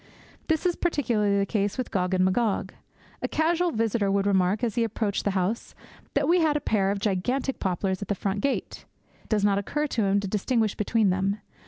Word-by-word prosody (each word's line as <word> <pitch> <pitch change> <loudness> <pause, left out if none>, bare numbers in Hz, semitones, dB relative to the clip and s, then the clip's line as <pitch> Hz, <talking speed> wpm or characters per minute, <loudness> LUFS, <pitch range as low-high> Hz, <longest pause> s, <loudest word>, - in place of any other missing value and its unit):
That 320 +2 0
is 350 -1 +2
particularly 230 - +1
the 200 - +2
case 205 +1 -1
with 255 - -3
Gog 185 -1 0
and 185 0 +3
Magog. 200 -1 0 0.5
A - - -1
casual 340 +3 +1
visitor 220 -4 0
would 200 0 +1
remark, 195 +2 +2
as 230 -3 0
he 235 - +1
approached 215 -2 -2
the - - +3
house, 190 +5 -2 0.4
that 280 0 +2
we 350 +2 +4
had 310 -3 +2
a - - -1
pair 200 -8 +1
of 200 - 0
gigantic 220 +7 -1
poplars 190 +1 -1
at 200 - -4
the 205 - 0
front 195 +1 -2
gate. 280 - -2 0.4
It - - -26
does 210 -2 +2
not 200 -1 +3
occur 295 +9 -2
to 230 -7 0
him 195 +1 +2
to 200 - -3
distinguish 215 +2 0
between 210 -1 +1
them. 195 +2 0
205 Hz, 210 wpm, -26 LUFS, 195-250 Hz, 0.5 s, we